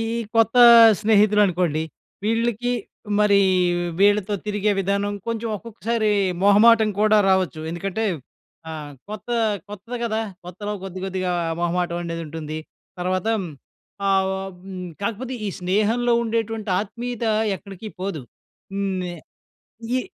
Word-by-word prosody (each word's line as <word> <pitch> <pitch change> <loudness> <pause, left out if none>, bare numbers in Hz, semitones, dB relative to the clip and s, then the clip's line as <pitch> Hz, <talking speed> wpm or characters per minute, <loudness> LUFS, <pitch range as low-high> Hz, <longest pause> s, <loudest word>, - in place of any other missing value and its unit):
ఈ - - -1 0.2
కొత్త 225 +1 +3 0.5
స్నేహితులు 210 -1 +4
అనుకోండి. 175 -4 0 0.4
వీళ్ళకి 230 +2 0 0.5
మరీ 205 -1 +5 0.6
వీళ్ళతో 205 0 +3
తిరిగే 210 0 0
విధానం, 200 +1 0
కొంచెం 230 0 -2
ఒక్కొక్కసారి 225 0 -2 0.3
మొహమాటం 220 +2 +6
కూడా 215 0 +5
రావొచ్చు. 185 -5 +1
ఎందుకంటే, 190 +5 -3 0.7
ఆహ్, 150 -2 -7 0.2
కొత్త, 215 +3 -8 0.4
కొత్తది 210 +4 -7
గదా! 220 -1 -1 0.2
కొత్తలో 205 +4 -5
కొద్ది, 190 -1 -6
కొద్దిగా 185 -1 -2 0.3
మొహమాటం 175 0 -1
అనేదుంటుంది. 160 -2 -5 0.4
తర్వాత 185 +1 -1
హ్మ్, 185 -5 -4 0.6
ఆహ్, 190 0 +3
ఆహ్, 195 0 -6 0.2
హ్మ్, 185 -2 -6 0.2
కాకపోతే, 235 +5 -3
ఈ - - -1
స్నేహంలో 215 +6 +1
ఉండేటువంటి 225 -2 -2
ఆత్మీయత 235 +3 -5 0.3
ఎక్కడికి 200 +3 -10
పోదు. 185 -7 -4 0.5
హ్మ్. 200 -1 -1
నే 175 -1 -4 0.8
ఈ 255 - -1
200 Hz, 115 wpm, -22 LUFS, 185-220 Hz, 0.8 s, మొహమాటం